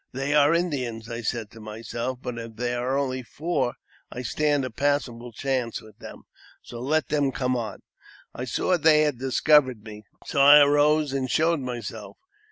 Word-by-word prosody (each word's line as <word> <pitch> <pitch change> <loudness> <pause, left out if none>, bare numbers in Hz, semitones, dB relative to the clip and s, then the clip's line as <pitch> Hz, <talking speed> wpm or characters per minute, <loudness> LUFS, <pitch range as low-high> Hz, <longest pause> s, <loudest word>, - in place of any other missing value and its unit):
They 135 +3 -2
are 150 0 +5
Indians, 130 -10 -2
I 115 0 -4
said 110 -2 -3
to 115 - -13
myself; 115 +3 -5
but 120 -1 -5
if 115 -1 -9
there 120 +1 -2
are 135 - +1
only 130 -2 -2
four, 140 0 -2 0.4
I 125 - -6
stand 145 +2 0
a 130 - -6
passable 125 -3 -1
chance 125 -1 -2
with 110 -1 -17
them, - - -11 0.4
so 120 - -9
let 145 +3 0
them 145 -2 +1
come 125 -1 -1
on. 110 -5 -5 0.5
I 125 - -5
saw 175 +9 0
they 155 -1 +5
had 150 -5 0
discovered 130 -3 +3
me, 105 -1 -10 0.2
so 140 - 0
I 145 +2 +9
arose 145 0 +3
and 130 -2 -2
showed 165 +3 +2
myself. 120 -4 -7
130 Hz, 175 wpm, -25 LUFS, 115-145 Hz, 0.5 s, I